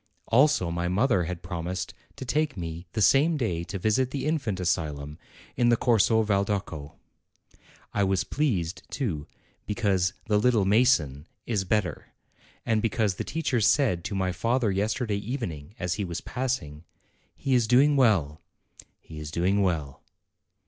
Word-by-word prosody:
Also 125 - +4
my 85 +1 -2
mother 95 -1 +2
had 85 0 -5
promised 90 0 -4 0.2
to 130 - -7
take 150 -1 0
me 85 0 -6
the 110 - +1
same 150 +8 +4
day 90 - -1
to 100 - -5
visit 110 +7 +1
the 135 0 -4
Infant 140 - -1
Asylum 75 -4 -2 0.4
in 120 -1 +3
the 120 - +4
Corso 110 -1 +3
Valdocco. 100 -7 -2 1.0
I 100 - +1
was 95 -1 +1
pleased, 100 - -1
too, 85 - -3 0.4
because 100 -4 +1
"the 105 -1 +2
little 110 -3 +3
mason" 95 - +2 0.2
is 105 -5 -1
better, 95 -4 -2 0.5
and 110 -2 +1
because 105 -3 0
the - - -2
teacher 140 -7 -1
said 110 - +3
to 100 - -3
my 95 -1 0
father 115 +5 0
yesterday 105 +2 -1
evening 100 - -5
as 90 -5 -1
he 105 - -2
was 85 -2 -4
passing, 90 - -3 0.5
"He 135 - -1
is 120 -3 +3
doing 140 +5 +5
well; 95 - +2 0.6
he 80 -1 -10
is 75 -1 -6
doing 95 +5 +1
well." 80 -8 -1
100 Hz, 150 wpm, -27 LUFS, 85-120 Hz, 1.0 s, doing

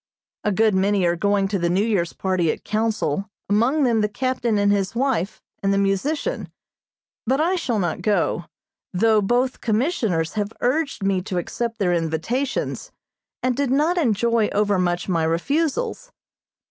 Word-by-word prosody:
A 210 - +1
good 215 +2 +3
many 190 0 +2
are 170 0 +2
going 200 +2 +1
to 200 -1 -1
the 170 0 +1
New 190 +4 +2
Year's 190 -7 0
party 185 -4 0
at - - -7
Council, 210 -5 -1 0.2
among 235 +9 +2
them 235 -4 +3
the 210 - +1
captain 255 -1 -1
and 205 0 +3
his 200 +1 0
wife, 240 -7 -1 0.2
and 195 - +1
the 200 - +2
musician; 200 - -1 0.8
but 265 +3 +2
I 345 +4 +2
shall 265 -10 -1
not 175 -5 -1
go, 180 -5 0 0.5
though 215 +3 +3
both 245 +5 0
commissioners 215 - 0
have 210 0 -2
urged 275 -2 0
me 195 -1 +1
to 185 -1 -4
accept 230 +6 -3
their 185 -5 +1
invitations, 170 - -2 0.5
and 255 -1 +1
did 280 0 0
not 305 +7 +2
enjoy 230 - +2
overmuch 185 -4 +1
my 170 -4 +1
refusals. 315 - -1
210 Hz, 160 wpm, -22 LUFS, 190-255 Hz, 0.8 s, good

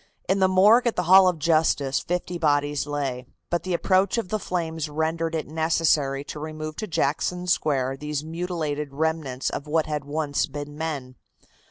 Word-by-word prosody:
In 190 +2 +2
the 190 - +5
morgue 210 +6 +5
at 235 - 0
the 180 - 0
Hall 185 +2 +7
of 180 -2 +1
Justice 155 -3 +2
fifty 180 0 -3
bodies 145 -2 +1
lay, 135 -4 -3 0.2
but 175 - +1
the 180 0 -1
approach 190 +4 +2
of 225 -6 -2
the 215 - -1
flames 165 -4 -3
rendered 160 +2 -1
it 155 - -2
necessary 155 -3 +1
to 150 - -7
remove 155 0 -6
to 215 - -4
Jackson 170 +2 -1
Square 135 -6 0
these 150 0 -4
mutilated 160 -4 -3
remnants 155 -4 -1
of 145 - -5
what 155 +1 +1
had 150 -2 -3
once 145 0 -1
been 145 0 -7
men. 145 -5 -5
155 Hz, 175 wpm, -25 LUFS, 145-175 Hz, 0.2 s, Hall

